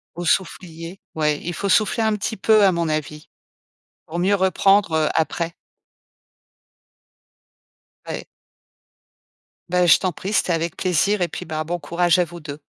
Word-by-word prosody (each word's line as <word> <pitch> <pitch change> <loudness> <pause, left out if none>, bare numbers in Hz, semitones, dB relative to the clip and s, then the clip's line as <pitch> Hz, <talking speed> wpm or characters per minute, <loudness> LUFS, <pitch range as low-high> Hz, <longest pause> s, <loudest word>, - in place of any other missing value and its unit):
Au 175 - -5
soufflier, 170 0 -2 0.2
ouais, 150 -1 +1
il 175 - -4
faut 200 +4 -3
souffler 220 +2 +2
un 220 -1 +1
petit 210 +2 -4
peu 215 +1 +4
à 190 - +5
mon 170 -2 -1
avis 150 0 -4 0.8
pour 170 - -5
mieux 190 +3 +2
reprendre, 195 0 +3
heu, 155 -1 +2
après. 165 +1 -1 2.5
Ouais. - - -6 1.4
Bah, 180 0 +2
je 165 - +7
t'en 185 -2 -1
prie, 195 +6 -6
c'était 185 -4 +1
avec 165 0 -2
plaisir 190 +3 +1
et 175 - +2
puis, - - -7
bah, 155 -1 -3
bon 175 +2 -2
courage 175 +2 +1
à 180 - +4
vous 170 +1 -11
2. 150 -1 -8
175 Hz, 155 wpm, -21 LUFS, 160-195 Hz, 2.5 s, je